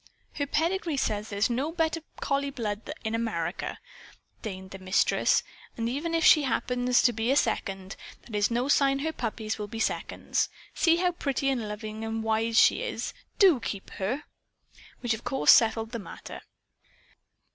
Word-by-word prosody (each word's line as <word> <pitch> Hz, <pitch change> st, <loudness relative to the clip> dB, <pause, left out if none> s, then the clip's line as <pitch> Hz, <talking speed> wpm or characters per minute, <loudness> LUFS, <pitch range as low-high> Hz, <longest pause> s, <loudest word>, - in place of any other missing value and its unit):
"Her 285 Hz, -1 st, -2 dB
pedigree 330 Hz, +1 st, 0 dB
says 210 Hz, -4 st, -1 dB
there's 200 Hz, 0 st, +1 dB
no 260 Hz, +6 st, -1 dB
better 330 Hz, -1 st, 0 dB, 0.2 s
collie 280 Hz, 0 st, 0 dB
blood 220 Hz, -6 st, -4 dB
in 220 Hz, 0 st, -2 dB
America," 195 Hz, -7 st, -2 dB, 0.6 s
denied 190 Hz, -3 st, -7 dB
the 195 Hz, -, -8 dB
Mistress. 185 Hz, +1 st, +2 dB, 0.3 s
"And 230 Hz, -1 st, -1 dB
even 300 Hz, +7 st, -2 dB
if 330 Hz, -, +2 dB
she 305 Hz, -, +8 dB
happens 250 Hz, -1 st, +1 dB
to 240 Hz, -, +4 dB
be 225 Hz, +2 st, -1 dB
a 270 Hz, -, +4 dB
'second,' 195 Hz, -7 st, -1 dB, 0.3 s
that's 210 Hz, -2 st, +1 dB
no 240 Hz, +2 st, 0 dB
sign 275 Hz, -1 st, +4 dB
her 320 Hz, +3 st, -2 dB
puppies 220 Hz, -4 st, -3 dB
will 210 Hz, -, -3 dB
be 225 Hz, +2 st, -7 dB
seconds. -, -, -1 dB, 0.2 s
See 330 Hz, -1 st, +4 dB
how 355 Hz, +1 st, +2 dB
pretty 275 Hz, -5 st, -1 dB
and 240 Hz, -6 st, -1 dB
loving 215 Hz, +1 st, -6 dB
and 225 Hz, 0 st, -3 dB
wise 225 Hz, +1 st, +1 dB
she -, -, +5 dB
is. -, -, -3 dB, 0.2 s
DO 375 Hz, -, +6 dB
keep 200 Hz, -4 st, -5 dB
her!" 245 Hz, +10 st, -1 dB, 0.8 s
Which 240 Hz, -2 st, +1 dB
of 220 Hz, -, -6 dB
course 150 Hz, -, +4 dB
settled 225 Hz, 0 st, +4 dB
the 235 Hz, -, -4 dB
matter. 205 Hz, -, -9 dB
230 Hz, 165 wpm, -28 LUFS, 215-280 Hz, 0.8 s, she